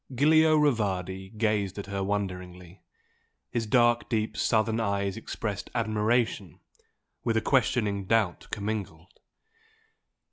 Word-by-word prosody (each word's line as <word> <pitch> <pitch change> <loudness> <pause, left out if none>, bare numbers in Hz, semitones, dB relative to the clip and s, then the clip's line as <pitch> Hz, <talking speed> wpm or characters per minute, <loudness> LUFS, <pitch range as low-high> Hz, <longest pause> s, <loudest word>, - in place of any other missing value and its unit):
Giulio 155 +4 +4
Rivardi 95 - 0
gazed 105 -3 0
at 100 - -5
her 100 -1 -3
wonderingly, 90 -3 -4 0.7
his 115 -2 -2
dark 120 +1 +3
deep 110 -2 -1
Southern 110 0 +1
eyes 100 -3 -1
expressed 105 -2 -5
admiration 110 -5 0 0.6
with 115 -2 +1
a - - +2
questioning 105 -7 +1
doubt 105 -3 +1
commingled. 100 -5 -5
105 Hz, 105 wpm, -27 LUFS, 95-115 Hz, 0.7 s, Giulio